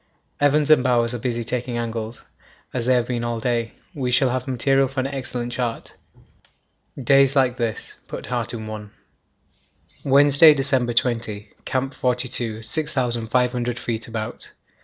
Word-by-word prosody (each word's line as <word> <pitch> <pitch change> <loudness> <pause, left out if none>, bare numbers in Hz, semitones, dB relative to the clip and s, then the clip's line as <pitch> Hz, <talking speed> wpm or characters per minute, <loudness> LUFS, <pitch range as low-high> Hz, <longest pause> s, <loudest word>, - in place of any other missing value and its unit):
Evans 145 +1 +3
and 150 -5 +6
Bowers 120 -2 +2
are 120 - -4
busy 120 0 -2
taking 125 +1 -3
angles; 115 -1 -5 0.5
as 120 -2 -2
they 130 - +4
have 120 -1 +1
been 120 -1 -3
all 120 -1 -2
day, 115 -1 -1 0.2
we 135 -6 -2
shall 125 +1 +3
have 130 +1 -3
material 135 +2 +2
for 135 +1 -5
an 130 - 0
excellent 130 -3 -4
chart. 120 -3 -4 1.1
Days 135 +1 +4
like 130 -3 +3
this 115 -3 -3
put - - -7
heart 120 -2 -2
in 110 -2 -6
one. 105 -1 -7 1.1
Wednesday, 145 +3 +6
December 130 -4 +2
20. 115 -4 -1
Camp 135 +1 -2
42. 125 -3 -1
6500 125 -3 0
feet 115 -2 -4
about. 110 -2 -6
125 Hz, 145 wpm, -22 LUFS, 115-135 Hz, 1.1 s, and